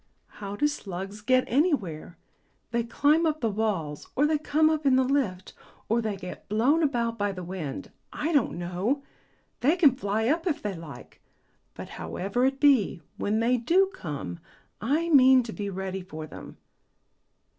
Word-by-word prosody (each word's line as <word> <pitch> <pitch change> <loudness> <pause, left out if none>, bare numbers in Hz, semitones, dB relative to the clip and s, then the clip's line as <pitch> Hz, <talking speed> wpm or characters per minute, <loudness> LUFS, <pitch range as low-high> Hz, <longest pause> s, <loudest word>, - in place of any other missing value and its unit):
"How 200 0 -5
do 295 - +1
slugs 200 -7 -4
get 255 +3 +3
anywhere? 220 - 0 0.5
They 235 0 +1
climb 295 +7 +2
up 310 0 -1
the 230 -6 0
walls, 195 -9 -2
or 285 - +3
they 305 0 +2
come 310 +1 +2
up 315 -1 +1
in 270 -2 +4
the 260 - +4
lift, 250 -9 -1 0.4
or 230 +2 +2
they 215 -3 -3
get 180 -1 -9
blown 250 +10 +3
about 235 -6 0
by 205 0 +1
the 185 -2 -7
wind 170 -6 -6 0.2
I 320 +3 -2
don't 285 - +2
know. 185 +11 -2 0.6
They 295 +7 +3
can 300 -8 +5
fly 220 -2 -1
up 330 +6 +1
if 310 - 0
they 205 -1 -2
like; 165 -5 -11 0.5
but, - - -7
however 200 +7 -1
it 270 +1 0
be, 255 - +3
when 215 +2 0
they 245 +2 +3
do 365 +11 +3
come, 140 - -6 0.4
I 300 +9 0
mean 260 -4 +7
to 225 -2 -7
be 205 -1 -4
ready 190 0 -4
for 160 -3 -8
them." - - -11
230 Hz, 170 wpm, -27 LUFS, 190-285 Hz, 0.6 s, mean